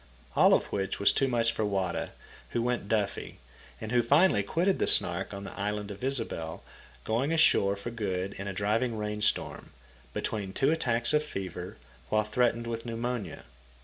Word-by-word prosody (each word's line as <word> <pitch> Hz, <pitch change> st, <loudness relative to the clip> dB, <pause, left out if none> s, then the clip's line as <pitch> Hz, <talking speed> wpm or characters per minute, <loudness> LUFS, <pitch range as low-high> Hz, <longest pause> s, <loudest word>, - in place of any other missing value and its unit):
All -, -, +7 dB
of -, -, 0 dB
which 95 Hz, -1 st, -2 dB
was 100 Hz, -, +5 dB
too 135 Hz, -, +1 dB
much 115 Hz, -2 st, +2 dB
for 110 Hz, -, -2 dB
Wada, 95 Hz, -4 st, -1 dB, 0.4 s
who 120 Hz, -, +1 dB
went 120 Hz, -4 st, -1 dB
daffy, 105 Hz, -3 st, -1 dB, 0.4 s
and 110 Hz, -, -6 dB
who 120 Hz, -1 st, +4 dB
finally 140 Hz, -, +4 dB
quitted 170 Hz, -, +1 dB
the -, -, +2 dB
Snark 85 Hz, +2 st, 0 dB
on 100 Hz, -1 st, -6 dB
the -, -, -7 dB
island 105 Hz, 0 st, -3 dB
of 100 Hz, +4 st, -9 dB
Ysabel, 115 Hz, -12 st, -3 dB, 0.4 s
going 125 Hz, +7 st, 0 dB
ashore 100 Hz, -11 st, +4 dB
for 100 Hz, +4 st, -6 dB
good 100 Hz, -4 st, -2 dB
in 100 Hz, -, -4 dB
a -, -, -2 dB
driving 110 Hz, +5 st, 0 dB
rain 105 Hz, 0 st, -3 dB
storm, 105 Hz, -, 0 dB, 0.4 s
between 100 Hz, -, -3 dB
two 135 Hz, +7 st, +3 dB
attacks 120 Hz, -6 st, +1 dB
of 150 Hz, 0 st, +4 dB
fever, 95 Hz, -7 st, -6 dB, 0.3 s
while 110 Hz, 0 st, +3 dB
threatened 115 Hz, +2 st, +1 dB
with 115 Hz, -1 st, -4 dB
pneumonia. 115 Hz, -5 st, -4 dB
110 Hz, 175 wpm, -29 LUFS, 100-120 Hz, 0.4 s, All